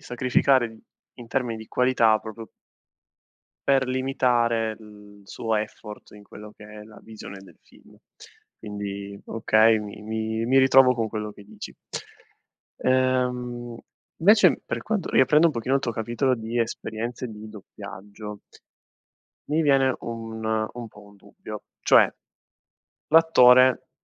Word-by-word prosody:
sacrificare 125 0 +1
di 110 0 -16 0.3
in 120 -2 -12
termini 120 -4 -2
di 110 - -11
qualità 120 -4 +3
proprio 110 +1 -9 1.2
per 135 -1 +3
limitare, 120 -4 0
l 105 -2 -16
suo 110 +3 -3
effort 105 0 -6
in 105 -1 -14
quello 105 +1 -12
che 105 - -14
è 105 0 -11
la 105 0 -15
visione 110 -3 -10
del - - -18
film. - - -21 0.6
Quindi, 100 -1 -7
okay, 110 0 +3
mi 105 0 -9
mi 110 +1 -3
mi 135 +2 +4
ritrovo 130 -1 +6
con 115 -2 -1
quello 105 -1 -5
che 100 - -15
dici. 105 0 -10 1.1
Uhm, 125 -2 0 0.5
invece, 210 +4 +6
per - - -4
quanto 215 -3 -2
riaprendo 150 +5 +4
un 160 - +1
pochino 130 +2 -1
il 135 - -2
tuo 115 - -3
capitolo 120 +4 -1
di 115 +1 -4
esperienze 115 +1 -4
di 110 0 -10
doppiaggio 105 0 -10 1.1
mi 155 +2 +1
viene 135 -3 +3
un 115 -1 -7 0.3
un 120 -1 -8
po' 105 -1 -16
un 100 0 -18
dubbio. - - -11 0.2
Cioè, - - +5 1.0
l'attore, 130 -6 +5
115 Hz, 130 wpm, -24 LUFS, 105-130 Hz, 1.2 s, ritrovo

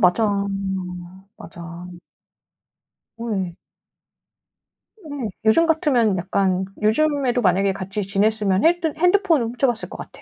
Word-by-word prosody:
맞아. 185 +3 +4 1.1
맞아. 170 +1 -10 1.3
오 230 - -6
왜. 185 -5 -2 1.5
네. 285 -7 -5 0.2
요즘 220 +10 +5
같으면 260 - +2
약간 190 +1 0 0.2
요즘에도 255 +2 +2
만약에 195 +1 +2
같이 195 +2 -4
지냈으면 200 0 +1
핼드 330 -2 +2
핸드폰을 355 - +3
훔쳐봤을 240 -1 -1
것 - - -8
같아. - - -11
220 Hz, 235 characters per minute, -22 LUFS, 190-285 Hz, 1.5 s, 요즘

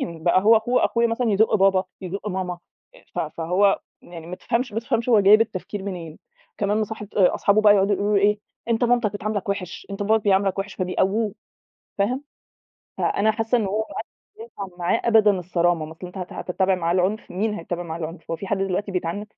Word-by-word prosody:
بقى 170 +2 +1
هو 225 +2 +6
أخو 240 +3 +1
أخويا 235 0 +2
مثلًا 230 -1 0
يزُق 215 +2 +3
بابا، 195 -2 +3 0.2
يزُق 195 +3 -5
ماما 185 -2 -3 0.6
ف - - -5
فهو 180 +5 +1 0.2
يعني 165 -2 -10
ما 180 - -6
تفهمش 240 +2 -2
ما 220 - -1
تفهمش 235 +1 -1
هو 225 -4 +6
جايب 205 +3 +7
التفكير 205 -2 -3
منين، 175 -5 -6 0.4
كمان 205 +1 +1
مصاحب 215 -1 -4
أصحابه 200 +1 +3
بقى 210 -1 +7
يقعدوا 200 0 +3
يقولوا 205 +2 +1
له - - -1
إيه 210 +1 +3 0.3
"أنت 230 +1 +2
مامتك 240 -3 +2
بتعاملك 205 -1 -3
وِحِش، 185 -3 -4
أنت 200 +1 -4
باباك 220 +2 +3
بيعاملك 195 -1 +2
وِحِش" 195 0 -4
فبيقوّوه، 195 +3 0 0.6
فاهم، 250 +8 0 0.7
فأنا 215 +2 +2
حاسة 225 +2 0
إن 215 - -1
هو 200 +3 -1
ما - - -11
عادش - - -6 0.4
ينفع 190 -3 -8
معاه 175 0 +1
أبدًا 220 -3 +5
الصرامة، 175 -2 0
ما 160 - -9
أصل 180 +3 -9
أنت 180 +2 -10
هت 180 -1 -6
هتتَّبع 190 +1 0
معاه 170 -2 -1
العُنف، 190 +4 0
مين 210 +4 -1
هيتَّبع 175 -2 -4
معاه 165 -1 -6
العُنف، 165 +1 -7
هو 165 - -1
في 195 - -7
حد 195 +1 -1
دلوقتي 195 +1 -2
بيتعنِّف؟! 180 +2 -2
200 Hz, 200 wpm, -23 LUFS, 180-215 Hz, 0.7 s, جايب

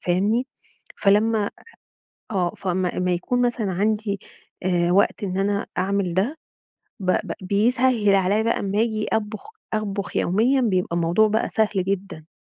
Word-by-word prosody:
فاهمني؟ 205 +8 +1 0.5
فلمّا 210 +1 +2 0.8
آه 180 -3 0
فاما 185 -1 -1
اما 180 0 +1
يكون 180 +8 0
مثلًا 240 -5 0
عندي 205 +1 0 0.4
آآ، 175 -1 +1
وقت 200 +2 +2
إن 185 -1 -2
أنا 200 +1 0
أعمل 190 -1 0
ده 225 - 0 0.6
ب 185 -1 0
ب - - -1
بيسهّل 220 +2 +2
عليَّ 195 +3 +2
بقى 230 - 0
امّا 200 +1 -1
أجي 220 -2 0
أطبخ 215 - -3 0.2
أطبخ 205 -2 -3
يوميًا 235 +9 +2
بيبقى 185 -7 0
الموضوع 175 +6 +3
بقى 220 +2 0
سهل 220 -1 +2 0.2
جدًا. 190 -5 -4
200 Hz, 140 wpm, -23 LUFS, 185-220 Hz, 0.8 s, الموضوع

